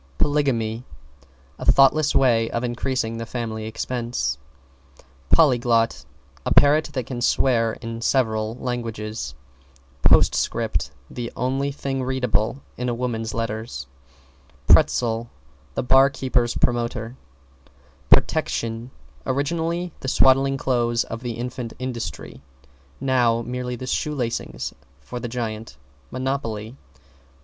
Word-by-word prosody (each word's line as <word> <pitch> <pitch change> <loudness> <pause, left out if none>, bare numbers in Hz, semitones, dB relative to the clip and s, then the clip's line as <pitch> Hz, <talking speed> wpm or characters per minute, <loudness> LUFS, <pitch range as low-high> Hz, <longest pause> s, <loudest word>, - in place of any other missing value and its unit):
=POLYGAMY= 120 - +1 0.8
A - - +4
thoughtless 140 +2 +4
way 115 -4 +4
of 115 - -2
increasing 120 -1 -1
the 115 - -4
family 110 -2 -4
expenses. 115 - -2 0.9
=POLYGLOT= 120 - +3 0.4
A - - -2
parrot 150 +2 +5
that 130 -3 -2
can 120 -1 -5
swear 115 -3 +2
in 115 0 -6
several 110 -3 +1
languages. 115 - -4 0.7
=POSTSCRIPT= - - +3 0.2
The 120 -1 -5
only 135 +3 0
thing 135 -1 -3
readable 125 -1 0
in 125 0 -1
a 120 - -1
woman's 115 -2 -3
letter. 110 -1 -2 1.0
=PRETZEL= 115 - +4 0.5
The - - -1
bar 135 +2 +6
keeper's 130 -3 0
promoter. 120 0 -1 0.9
=PROTECTION= 115 +1 +2 0.4
Originally, 165 +5 -1
the - - -6
swaddling 135 +1 +4
clothes 120 -3 +1
of 115 +1 -7
the 120 -2 -3
infant, 120 0 -5
Industry; 125 - -5 0.6
now, 120 -3 +2
merely 125 +1 -3
the 130 - -7
shoe 150 +4 -1
lacings 120 -4 -3 0.3
for 70 - -7
the 120 - -4
giant, 115 - -5 0.3
Monopoly. 125 -4 -3
120 Hz, 110 wpm, -23 LUFS, 115-130 Hz, 1.0 s, bar